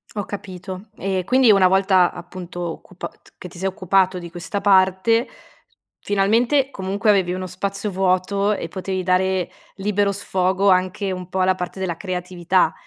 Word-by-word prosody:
Ho 205 - -2
capito. 190 0 -7
E 190 -1 -2
quindi, 255 -1 +5
una 195 -2 +6
volta, 190 -1 +4
appunto, 175 0 -8
occupat 175 +2 -8
che 180 - -9
ti 175 - -14
sei 190 +2 -1
occupato 190 0 +1
di 170 -1 -9
questa 175 +3 -4
parte, 195 +4 +3 0.7
finalmente, 235 +8 +2
comunque 195 +2 -1
avevi 185 -3 +3
uno 185 0 -4
spazio 195 +3 -3
vuoto, 190 +2 +1
e - - -4
potevi 185 -1 -3
dare, 185 0 +1 0.2
libero 200 0 0
sfogo, 190 0 +1
anche 185 +2 +1
un 180 -1 -5
po' 190 0 -2
alla 185 0 +3
parte 180 +1 -6
della 175 -3 -2
creatività. 180 -2 0
190 Hz, 155 wpm, -21 LUFS, 185-200 Hz, 0.7 s, una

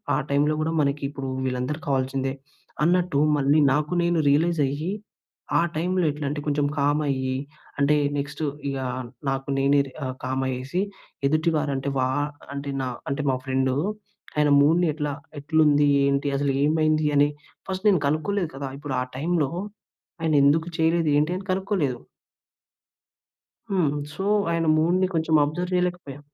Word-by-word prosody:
ఆ - - +2
టైంలో 145 +2 +2
కూడా 160 - 0
మనకి 140 +1 0
ఇప్పుడు 135 -2 -5 0.2
వీళ్ళందరు 125 +4 -2
కావాల్సిందే, 135 0 0 0.5
అన్నట్టు 175 -3 +2 0.2
మళ్ళీ 145 +2 +3
నాకు 150 +2 0
నేను 170 -1 +2
రియలైజ్ 165 +3 +2
అయ్యి, 150 +6 -3 0.7
ఆ - - +4
టైంలో 180 +2 0
ఎట్లాంటే 145 0 -3
కొంచెం 145 0 +1
కామ్ 145 +1 +2
అయ్యి, 130 -1 -1 0.4
అంటే 140 +1 +4 0.2
నెక్స్ట్ 145 +2 -4 0.3
ఇగ 135 - -2 0.5
నాకు 135 0 -2
నేనే 140 +1 +4
రి - - -12
ఆహ్, 130 - -4
కామ్ 130 +1 -1
అయ్యేసి, 130 +8 -2 0.5
ఎదుటివారు 155 0 +1
అంటే 135 +1 -2
వ - - +1 0.5
అంటే 140 0 -5
న - - -2 0.3
అంటే 140 +2 -1
మా - - +1
ఫ్రెండ్ 130 0 +1 0.7
ఆయన 150 -1 +4
మూడ్‌ని 165 +4 +4
ఎట్లా 150 -1 -2 0.3
ఎట్లుంది, 150 -1 +3 0.2
ఏంటి, 140 +1 +1
అసలు 140 0 +1
ఏమైంది 155 0 +2
అని, 145 +1 +5 0.4
ఫస్ట్ 190 +2 -4
నేను 185 -5 +4
కనుక్కోలేదు 165 +4 0
కదా! 135 0 -4
ఇప్పుడు 145 -2 -5
ఆ - - 0
టైంలో 155 0 0 0.7
ఆయనేందుకు 155 +1 +3
చేయలేదు, 165 0 +2
ఏంటి, 155 +4 +2
అని 190 - -8
కనుక్కోలేదు. 185 - -1 1.7
హ్మ్. 180 -7 +2 0.2
సో 195 - -4 0.3
ఆయన 165 -1 0
మూడ్‌ని 175 +4 +3
కొంచెం 160 -1 +1
అబ్జర్వ్ 175 +5 -3
చేయలేకపోయా. 180 -6 -2
150 Hz, 145 wpm, -24 LUFS, 140-165 Hz, 1.7 s, అని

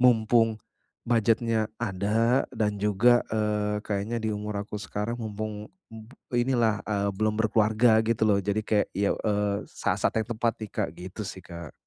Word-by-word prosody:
mumpung 115 -2 +4 0.5
budget-nya 115 -1 +2
ada, 115 +4 +1
dan 105 -2 0
juga, 105 +4 +4
eee, 105 -1 -1
kayaknya 105 +3 -2
di 110 - -1
umur 105 0 -3
aku 105 0 -6
sekarang 105 +3 -3
mumpung, 105 -1 -5 0.2
mmm, 110 0 -10 0.2
inilah, 120 -4 +2
eee, 100 -1 0
belum 105 +2 0
berkeluarga 110 +1 +3
gitu 115 -1 +1
loh. 100 -2 +3
Jadi 100 +2 -1
kayak, 105 -1 +1
ya, 100 0 +2
eee, 105 -1 0
saat-saat - - -1
yang - - -27
tepat 115 0 +1
nih 110 - -6
Kak, - - -1
gitu 90 +4 -8
sih 95 -2 -9
Kak. 85 -3 -9
110 Hz, 155 wpm, -27 LUFS, 105-115 Hz, 0.5 s, mumpung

